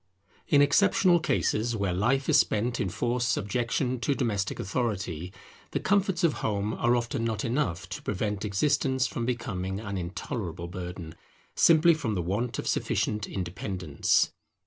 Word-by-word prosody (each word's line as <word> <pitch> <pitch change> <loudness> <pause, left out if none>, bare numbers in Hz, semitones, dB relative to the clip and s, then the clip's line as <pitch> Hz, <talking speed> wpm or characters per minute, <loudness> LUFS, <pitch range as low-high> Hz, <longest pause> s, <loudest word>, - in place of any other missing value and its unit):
In 145 -1 +5
exceptional 180 +3 +4
cases 120 -6 0
where 100 -4 -1
life 125 +9 +1
is 155 -1 +5
spent 115 +1 +1
in 95 - 0
forced 120 +5 -1
subjection 120 +4 -1
to 135 +4 0
domestic 105 -8 -1
authority, 95 -6 -2 0.4
the - - +1
comforts 195 -3 +1
of 165 -3 +4
home 105 0 -1
are 120 +1 +2
often 120 -1 -1
not 110 -2 -1
enough 115 - -1
to - - -6
prevent 105 +1 -2
existence 130 +5 +1
from 115 0 -3
becoming 95 -6 -3
an 100 -3 -4
intolerable 85 - -5
burden, 90 -2 -7 0.4
simply 165 +1 +6
from 130 -9 -2
the 90 - -1
want 105 +7 -2
of - - -4
sufficient 105 0 0
independence. 90 -3 0
110 Hz, 145 wpm, -28 LUFS, 95-130 Hz, 0.4 s, simply